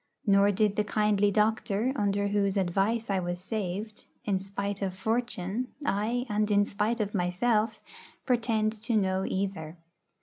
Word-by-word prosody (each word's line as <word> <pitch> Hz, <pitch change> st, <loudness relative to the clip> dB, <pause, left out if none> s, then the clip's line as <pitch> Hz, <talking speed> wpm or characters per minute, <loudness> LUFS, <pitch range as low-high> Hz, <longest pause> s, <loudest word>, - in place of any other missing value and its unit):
Nor 200 Hz, -1 st, +5 dB
did 205 Hz, +1 st, +1 dB
the 210 Hz, -, +3 dB
kindly 210 Hz, -1 st, +2 dB
doctor, 215 Hz, +3 st, +1 dB
under 200 Hz, -3 st, 0 dB
whose 200 Hz, -1 st, +1 dB
advice 195 Hz, +5 st, +1 dB
I 195 Hz, -, +1 dB
was 175 Hz, -1 st, -3 dB
saved, 205 Hz, +2 st, -4 dB, 0.2 s
'in 195 Hz, -2 st, +1 dB
spite 200 Hz, +1 st, -4 dB
of 190 Hz, -2 st, -2 dB
fortune,' 220 Hz, +1 st, -2 dB, 0.2 s
ay, 230 Hz, +3 st, 0 dB
and 210 Hz, -1 st, 0 dB
in 205 Hz, 0 st, +4 dB
spite 215 Hz, +4 st, -1 dB
of 210 Hz, -1 st, -2 dB
myself, 210 Hz, +4 st, 0 dB, 0.4 s
pretend 230 Hz, -4 st, +1 dB
to 225 Hz, 0 st, +1 dB
know 190 Hz, -1 st, +1 dB
either. 185 Hz, -4 st, -3 dB
205 Hz, 145 wpm, -28 LUFS, 195-220 Hz, 0.4 s, Nor